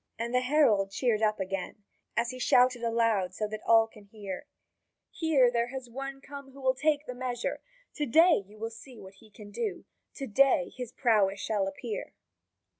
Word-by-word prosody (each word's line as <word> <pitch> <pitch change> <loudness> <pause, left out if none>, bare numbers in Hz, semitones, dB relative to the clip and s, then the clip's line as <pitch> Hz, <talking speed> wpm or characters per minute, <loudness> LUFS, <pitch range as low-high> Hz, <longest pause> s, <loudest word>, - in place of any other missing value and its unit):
And 235 +2 -3
the 250 - +4
herald 250 -8 +3
cheered 225 +1 0
up 215 -1 +1
again, 195 +2 -4 0.3
as 235 0 +1
he 255 - -8
shouted 250 0 +4
aloud 230 -5 +1
so 215 - -2
that 215 0 -6
all 225 -1 +6
could 215 -2 -17
hear: 200 -2 -8 0.6
"Here 285 -7 +3
there 235 0 0
has 250 -1 -8
one 270 +2 -6
come 280 -1 -10
who 275 - -13
will 260 -1 +2
take 295 +2 0
the 250 - -6
measure! 250 -1 -3 0.4
To 295 - -1
day 320 - +5
you 210 +1 -16
shall 225 +1 -4
see 230 +2 -13
what 190 0 -12
he 220 - -18
can 205 0 -13
do. 430 - -4 0.3
To 275 - -5
day 270 +5 +3
his 250 -2 -6
prowess 205 -6 +2
shall 205 -2 -1
appear." 210 +3 -6
235 Hz, 190 wpm, -29 LUFS, 210-265 Hz, 0.6 s, all